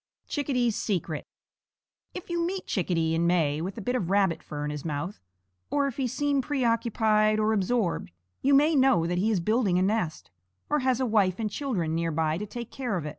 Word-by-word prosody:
CHICKADEE'S 250 -6 0
SECRET. 170 -7 -2 0.9
If 360 -1 -7
you 340 0 0
meet 370 +2 -3
Chickadee 165 -4 0
in 165 +1 +1
May 160 -4 +2
with 190 +5 -5
a - - -4
bit 250 +6 -1
of 190 -9 -1
rabbit 195 -3 +2
fur 150 -1 -5
in 150 - -2
his 150 -1 -5
mouth, 165 +5 -4 0.5
or 285 -1 +1
if 275 -4 -3
he 265 -2 0
seem 285 +2 0
preoccupied 225 -5 +2
or 215 +1 +2
absorbed, 200 - 0 0.3
you 275 +1 +4
may 300 +3 +4
know 260 - +4
that 175 +1 0
he 210 +4 +2
is 210 -4 +2
building 210 0 +1
a 185 - +3
nest, 190 - -1 0.4
or 300 - +3
has 260 -2 +1
a 260 - +1
wife 200 -5 +2
and 215 -2 -2
children 200 - -2
near 165 0 0
by 160 +1 0
to 210 - -5
take 235 +2 -7
care 245 -7 -2
of. 160 - -4
215 Hz, 205 wpm, -27 LUFS, 170-255 Hz, 0.9 s, you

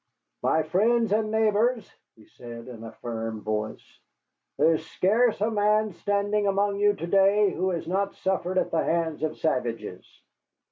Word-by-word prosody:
"My 160 - +2
friends 220 +7 +2
and 215 0 +1
neighbors," 220 +1 +1 0.3
he 110 - -19
said 120 -1 -11
in 115 -3 -9
a 115 - -8
firm 115 -1 -5
voice, 110 0 -5 0.6
"there 165 - +4
is 160 - -2
scarce 220 +5 +2
a 220 +2 +1
man 210 0 +2
standing 205 +2 0
among 200 0 +1
you 205 0 +3
to 170 - -5
day 195 +2 +4
who 185 +2 -1
has 170 -3 -3
not 195 +3 -1
suffered 185 -1 -1
at - - 0
the 165 - +1
hands 165 -2 -1
of 155 0 -2
savages. 120 -6 -2
190 Hz, 160 wpm, -26 LUFS, 155-210 Hz, 0.6 s, there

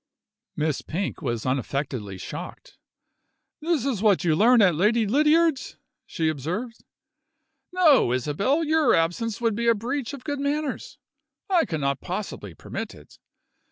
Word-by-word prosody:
Miss 155 -2 -1
Pink 180 +2 -4
was 120 -6 -3
unaffectedly 130 -5 -3
shocked. - - -9 0.8
"This 315 -5 0
is 250 -8 -1
what 210 -4 +3
you 165 -3 +2
learn 235 +7 +5
at 190 -5 +5
Lady 215 +8 +2
Lydiard's!" 300 +5 +2 0.3
she 165 -4 -1
observed. 175 - -4 0.9
"No, 320 - +4
Isabel, 150 - 0
your 315 -3 +3
absence 180 +7 -1
would 230 -2 +1
be 235 +3 -2
a 230 - +5
breach 245 +5 -3
of 260 - -13
good 285 -2 -3
manners 285 0 -3 0.5
I 350 -3 +4
cannot 140 -4 -2
possibly 175 - -6
permit - - -6
it. - - -17
215 Hz, 135 wpm, -25 LUFS, -, 0.9 s, learn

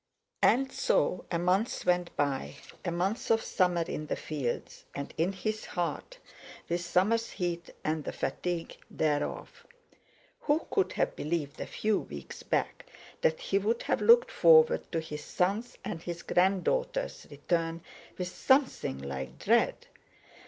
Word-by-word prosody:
And 265 +2 +4
so 180 - +1
a 170 - 0
month 185 +7 +1
went 180 -1 +1
by—a 140 +4 -3
month 185 +6 -1
of 225 0 +3
summer 180 -3 +2
in 155 -2 -5
the - - -1
fields, 140 -6 -4
and 140 - -5
in 170 +4 +1
his 215 +3 -3
heart, 175 - -3 0.5
with 175 +1 -1
summer's 200 +7 +2
heat 175 -2 -3
and 155 0 -1
the - - -4
fatigue 175 -2 -3
thereof. 145 -2 -2 0.7
Who 300 +2 +1
could 395 - +1
have - - 0
believed 150 -2 -3
a - - -4
few 215 -1 0
weeks 70 -2 -8
back - - -2 0.3
that 160 - +2
he 195 - +1
would 225 +4 0
have - - 0
looked 475 +1 +6
forward 470 -1 +5
to 165 - 0
his 150 -1 -7
son's 205 +10 -1
and 165 - -4
his 170 0 -6
grand 185 +1 +2
daughter's - - -1
return 165 +3 -1 0.3
with 180 -1 -3
something 265 - +2
like 65 -1 -5
dread! - - +2
175 Hz, 145 wpm, -30 LUFS, 160-215 Hz, 0.7 s, looked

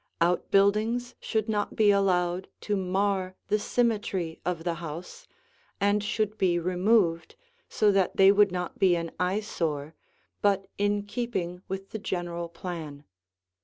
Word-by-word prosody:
Out 175 +1 +1
buildings 215 +5 +2
should 220 -1 -1
not 210 -2 -1
be 210 -2 +5
allowed 185 -2 +1
to 210 - -1
mar 190 0 0
the 210 - +2
symmetry 205 -8 -1
of 175 -2 -2
the 170 0 0
house 170 - -8 0.5
and 205 +1 +2
should 215 0 -1
be 175 -2 +3
removed 180 -1 +1 0.3
so 210 -1 +3
that 195 -2 +1
they 195 0 +8
would 205 -1 +4
not 180 -1 -4
be 185 -2 +5
an 170 -1 -3
eyesore 175 -6 -1 0.5
but 200 -1 +2
in 205 0 +1
keeping 205 -5 -3
with 195 +1 -6
the 220 - -4
general 175 -4 -3
plan. 165 -4 -7
190 Hz, 140 wpm, -27 LUFS, 175-205 Hz, 0.5 s, they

